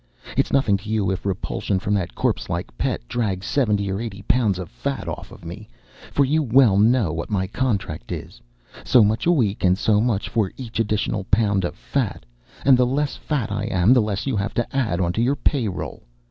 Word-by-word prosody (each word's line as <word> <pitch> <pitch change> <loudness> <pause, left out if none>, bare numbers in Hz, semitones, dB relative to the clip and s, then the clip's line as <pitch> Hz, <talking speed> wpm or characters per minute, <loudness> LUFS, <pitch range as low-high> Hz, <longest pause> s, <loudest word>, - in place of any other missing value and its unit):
It's - - +1
nothin' 120 -8 +3
to 100 +2 -10
you 105 -3 +1
if 95 +1 -3
repulsion 95 +1 -2
from 100 +2 -1
that 95 -4 -1
corpse - - -1
like - - -4
Pet - - -2
drags 100 - -2
seventy 105 -7 +1
or 95 +3 -2
eighty 105 -4 -6
pounds 110 -5 +2
of 90 -2 -5
fat - - -4
off - - -6
of - - -13
me, 105 +6 -8 0.4
for 140 - +3
you 155 +4 +2
well 125 -5 +5
know 110 -4 +3
what 85 0 -4
my 95 -3 0
contract 100 - -2
is - - -7 0.4
so 125 -3 +5
much 110 +7 +1
a - - +6
week 115 - +1
and 90 0 +4
so 105 0 +2
much 110 -4 0
for 105 -5 0
each 120 -4 -6
additional 105 -2 0
pound 100 -2 +2
of 85 - -3
fat, 120 - -3 0.4
and 135 -2 +7
the 125 - +4
less 140 +3 -1
fat 135 -9 -2
I 105 +1 -2
am 95 +1 +3
the 125 - +5
less 105 -2 -2
you 135 -4 -1
have 100 +2 -2
to 120 +2 -2
add 115 -10 0
onto 90 +4 0
your 130 +4 +2
pay 135 -5 +1
roll. 95 - -5
105 Hz, 215 wpm, -22 LUFS, 95-125 Hz, 0.4 s, and